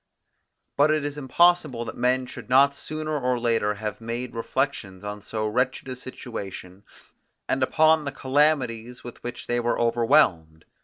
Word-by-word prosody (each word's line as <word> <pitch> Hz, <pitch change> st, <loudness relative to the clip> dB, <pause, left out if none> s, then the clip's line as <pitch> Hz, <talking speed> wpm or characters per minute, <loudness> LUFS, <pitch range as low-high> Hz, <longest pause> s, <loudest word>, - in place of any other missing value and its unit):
But 145 Hz, +2 st, +5 dB
it 155 Hz, -1 st, +1 dB
is 145 Hz, 0 st, -3 dB
impossible 150 Hz, -3 st, +2 dB
that -, -, -6 dB
men 125 Hz, +1 st, +1 dB
should 125 Hz, -, -10 dB
not 140 Hz, +2 st, +5 dB
sooner 155 Hz, +1 st, -4 dB
or 125 Hz, -1 st, 0 dB
later 115 Hz, -3 st, +1 dB
have 105 Hz, +1 st, -5 dB
made 120 Hz, +2 st, -4 dB
reflections 115 Hz, -5 st, -3 dB
on 105 Hz, 0 st, -6 dB
so 110 Hz, +1 st, -3 dB
wretched 125 Hz, +5 st, -1 dB
a 130 Hz, -, -4 dB
situation, 100 Hz, -7 st, -8 dB, 0.6 s
and 135 Hz, -, 0 dB
upon 155 Hz, +3 st, +3 dB
the 140 Hz, -, -2 dB
calamities 130 Hz, -4 st, 0 dB
with 120 Hz, -, -10 dB
which 120 Hz, -, -6 dB
they 120 Hz, 0 st, 0 dB
were 120 Hz, 0 st, 0 dB
overwhelmed. 90 Hz, -9 st, +2 dB
125 Hz, 155 wpm, -25 LUFS, 115-140 Hz, 0.6 s, But